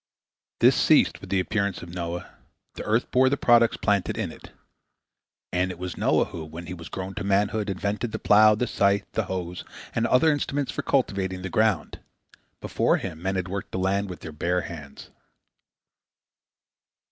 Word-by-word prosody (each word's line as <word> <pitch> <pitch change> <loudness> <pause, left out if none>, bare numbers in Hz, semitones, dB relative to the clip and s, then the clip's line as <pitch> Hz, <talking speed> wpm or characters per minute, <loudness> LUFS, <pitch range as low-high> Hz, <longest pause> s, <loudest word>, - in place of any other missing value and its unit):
This - - +6
ceased - - +3
with - - -10
the 100 - +2
appearance 100 -1 -1
of 85 0 -10
Noah: 85 -1 -5 0.4
the - - -7
earth 110 +3 0
bore 130 +1 +4
the 140 - 0
products 120 -2 +4
planted 100 -5 0
in - - -2
it. - - -13 1.0
And 90 +1 +1
it 90 - -6
was 90 0 -5
Noah - - +2
who, 85 - -7
when 80 +2 -9
he 90 - -6
was 85 -2 -9
grown 95 0 -5
to - - -5
manhood, 100 +2 +1
invented 100 +4 -2
the - - -3
plough, 105 +1 +6
the 125 - 0
scythe, 100 -3 +1
the 110 - -1
hoe, 90 -2 -4 0.4
and 115 0 +1
other 155 +5 +4
implements 145 -1 -1
for - - -3
cultivating 95 -8 -1
the 95 - -5
ground. 110 -5 +1 0.6
Before - - +1
him 80 - -6
men 95 +1 -1
had 95 -1 -2
worked 100 +1 -5
the - - -2
land 100 +1 0
with 90 - -8
their 80 - -7
bare 90 +4 0
hands. 75 -6 -10
95 Hz, 180 wpm, -25 LUFS, 90-110 Hz, 1.0 s, This